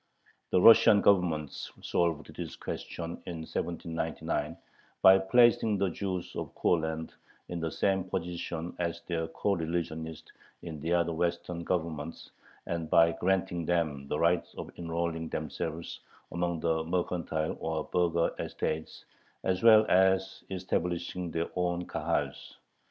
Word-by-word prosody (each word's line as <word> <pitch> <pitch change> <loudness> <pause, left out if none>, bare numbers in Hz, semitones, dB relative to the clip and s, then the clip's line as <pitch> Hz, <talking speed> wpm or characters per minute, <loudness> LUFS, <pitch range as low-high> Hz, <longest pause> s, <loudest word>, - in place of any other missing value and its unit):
The 90 - +3
Russian 110 0 +8
Government 85 -8 +3
solved 85 -3 -2
this - - -6
question 85 0 -6
in 85 -2 -5
1799, 80 0 -3 0.5
by 95 0 +9
placing 115 +1 +4
the 95 -2 +1
Jews 95 -1 -4
of - - -5
Courland 80 -1 0 0.4
in 85 - -3
the 80 0 -1
same 95 +2 0
position 90 -2 -4
as 85 -1 -2
their 80 -2 -2
coreligionists 80 -3 -3 0.3
in 80 -3 -6
the 80 +4 -3
other 85 -1 +2
western 85 +1 -2
Governments, 85 -3 -3 0.3
and 85 -2 -3
by 85 0 +6
granting 90 0 0
them 80 -5 -1
the 75 - -1
right 85 +1 +2
of - - -6
enrolling 85 -1 -2
themselves 80 +1 -4 0.3
among 85 -1 -1
the 80 -1 +1
mercantile 85 -2 -1
or 80 -1 -2
burgher 85 -1 +1
estates, 80 0 -4 0.4
as 95 0 0
well 110 -2 +8
as 95 0 +3
establishing 90 -1 -2
their 85 +1 -2
own 90 0 0
Kahals. - - -2
85 Hz, 125 wpm, -30 LUFS, 80-90 Hz, 0.5 s, by